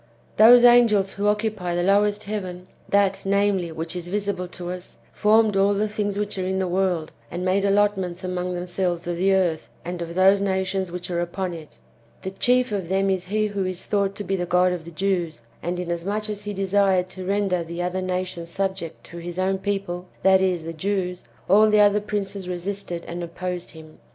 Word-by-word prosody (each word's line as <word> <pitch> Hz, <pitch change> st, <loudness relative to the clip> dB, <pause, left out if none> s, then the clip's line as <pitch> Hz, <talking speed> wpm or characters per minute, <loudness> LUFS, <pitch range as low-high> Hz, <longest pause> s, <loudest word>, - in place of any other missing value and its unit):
Those 240 Hz, +3 st, +8 dB
angels 225 Hz, -5 st, +5 dB
who 200 Hz, +1 st, -2 dB
occupy 210 Hz, -4 st, 0 dB
the 175 Hz, -, 0 dB
lowest 205 Hz, +2 st, +2 dB
heaven, 185 Hz, -3 st, -5 dB, 0.2 s
that, 195 Hz, -1 st, +2 dB
namely, 195 Hz, -3 st, +1 dB
which 160 Hz, +2 st, -4 dB
is 175 Hz, -1 st, -5 dB
visible 200 Hz, -1 st, -2 dB
to 175 Hz, 0 st, -7 dB
us, 180 Hz, 0 st, -8 dB, 0.2 s
formed 215 Hz, 0 st, +3 dB
all 200 Hz, +1 st, +3 dB
the 210 Hz, +2 st, +1 dB
things 205 Hz, -1 st, -2 dB
which 205 Hz, -1 st, -2 dB
are -, -, -1 dB
in 190 Hz, +1 st, -1 dB
the 190 Hz, -1 st, 0 dB
world, 180 Hz, -3 st, 0 dB, 0.2 s
and 180 Hz, +1 st, -4 dB
made 190 Hz, +2 st, +2 dB
allotments 195 Hz, -3 st, +1 dB
among 180 Hz, 0 st, -2 dB
themselves 175 Hz, -1 st, -2 dB
of 175 Hz, 0 st, -2 dB
the 190 Hz, +2 st, +2 dB
earth 180 Hz, -5 st, +1 dB, 0.2 s
and 175 Hz, 0 st, -4 dB
of 170 Hz, 0 st, -5 dB
those 195 Hz, +2 st, +5 dB
nations 190 Hz, -1 st, -1 dB
which 180 Hz, +1 st, -5 dB
are 170 Hz, 0 st, 0 dB
upon 175 Hz, +1 st, -3 dB
it. 160 Hz, -2 st, -10 dB, 0.5 s
The 190 Hz, -, -4 dB
chief 250 Hz, +3 st, +2 dB
of 190 Hz, -5 st, -3 dB
them 195 Hz, +1 st, +2 dB
is 185 Hz, -1 st, -1 dB
he 215 Hz, +3 st, 0 dB
who 200 Hz, -2 st, -2 dB
is 185 Hz, -1 st, -4 dB
thought 200 Hz, -1 st, 0 dB
to 205 Hz, -, -5 dB
be 195 Hz, -, -1 dB
the 175 Hz, -2 st, -2 dB
God 180 Hz, +1 st, +3 dB
of 175 Hz, -3 st, -4 dB
the -, -, -8 dB
Jews; 170 Hz, -6 st, -2 dB, 0.2 s
and 175 Hz, +1 st, -2 dB
inasmuch 180 Hz, +5 st, -2 dB
as 205 Hz, 0 st, -7 dB
he 205 Hz, -, -3 dB
desired 195 Hz, -1 st, +2 dB
to 185 Hz, 0 st, -8 dB
render 195 Hz, -2 st, 0 dB
the 170 Hz, +1 st, -5 dB
other 180 Hz, +1 st, -2 dB
nations 185 Hz, -2 st, -3 dB
sub 195 Hz, +2 st, -1 dB
ject 165 Hz, -3 st, -8 dB
to 170 Hz, -, -11 dB
his 175 Hz, +1 st, -7 dB
own 190 Hz, +1 st, 0 dB
people, 195 Hz, -3 st, -3 dB, 0.2 s
that 190 Hz, 0 st, +5 dB
is, 180 Hz, -3 st, +1 dB
the 165 Hz, +1 st, -5 dB
Jews, 180 Hz, +1 st, -2 dB, 0.2 s
all 215 Hz, +3 st, +6 dB
the 210 Hz, 0 st, +4 dB
other 205 Hz, 0 st, +5 dB
princes 200 Hz, -2 st, -4 dB
resisted 180 Hz, -1 st, -4 dB
and 175 Hz, +1 st, -5 dB
opposed 180 Hz, +1 st, -5 dB
him. 160 Hz, -1 st, -12 dB
190 Hz, 205 wpm, -24 LUFS, 175-200 Hz, 0.5 s, Those